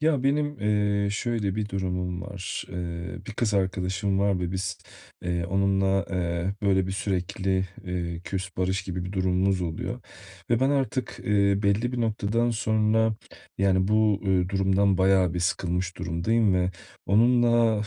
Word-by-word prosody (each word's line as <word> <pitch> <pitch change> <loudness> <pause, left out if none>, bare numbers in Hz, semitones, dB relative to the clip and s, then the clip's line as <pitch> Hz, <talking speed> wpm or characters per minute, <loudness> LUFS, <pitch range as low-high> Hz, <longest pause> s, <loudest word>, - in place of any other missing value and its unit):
Ya, 155 -4 +2
benim, 145 +1 0
eee, 105 -1 +1
şöyle 105 -2 -1
bir 105 -1 -2
durumum 90 -2 -3
var. 95 -1 -5
Eee, 85 -1 -5
bir - - -6
kız 110 -1 0
arkadaşım 95 +1 0
var 100 -2 +2
ve 90 0 -2
biz, 95 0 -3 0.4
eee, 85 -1 -1
onunla, 95 +1 +2
eee, 85 -2 -1
hep, 100 +2 -6
böyle, 95 -2 +2
bir, 95 - -3
sürekli, 95 0 -1 0.2
eee, 85 -2 -3
"küs, 95 0 -4
barış" 95 +1 0
gibi 90 -2 -4
bir 90 - -6
durumumuz 95 0 +1
oluyor 80 -2 -4 0.5
ve 120 0 +3
ben 135 +1 +3
artık, 135 -4 -1
eee, 100 -1 +2
belli 105 +5 +1
bir 125 - -2
noktadan 115 +1 0
sonra, 110 0 +2 0.4
yani, 95 -1 +2
bu, 105 -1 +3
eee, 95 -2 +2
durumdan 95 0 +2
bayağı 95 -2 +3
bir 90 - -1
sıkılmış 90 +1 -1
durumdayım 100 +5 +1
ve 90 0 +1 0.4
onunla, 115 0 +4
95 Hz, 155 wpm, -26 LUFS, 90-110 Hz, 0.5 s, onunla